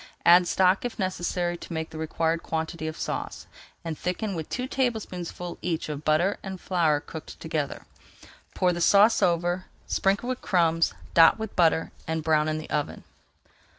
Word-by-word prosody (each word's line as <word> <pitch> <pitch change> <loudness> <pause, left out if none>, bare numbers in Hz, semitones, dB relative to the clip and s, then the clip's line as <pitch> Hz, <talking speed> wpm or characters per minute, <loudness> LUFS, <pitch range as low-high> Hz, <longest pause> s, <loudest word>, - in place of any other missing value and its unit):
Add 175 +1 +7
stock 185 +1 +3
if 245 - -4
necessary 175 -2 -1
to 170 - -9
make 160 0 -4
the 155 - -7
required 160 +1 -1
quantity 160 0 -3
of 155 - -5
sauce, - - -4 0.4
and 165 -1 -3
thicken 190 +6 -3
with 160 -3 -5
two 250 - -2
tablespoonfuls 210 -10 -3
each 165 -3 -2
of 150 0 -5
butter 165 +7 +2
and 190 -1 -6
flour 165 -6 +1
cooked 160 +1 -10
together. 155 -3 -3 0.7
Pour 180 -1 +2
the 175 - -4
sauce 205 +5 +5
over, 175 +1 +1 0.2
sprinkle 200 +5 0
with 255 - -3
crumbs, 165 -2 +2 0.2
dot 165 +3 +7
with 220 -2 -6
butter, 165 -2 +3 0.2
and 160 0 -2
brown 155 -1 +2
in 155 0 -1
the 155 - -8
oven. 150 -1 -2
170 Hz, 165 wpm, -26 LUFS, 160-185 Hz, 0.7 s, Add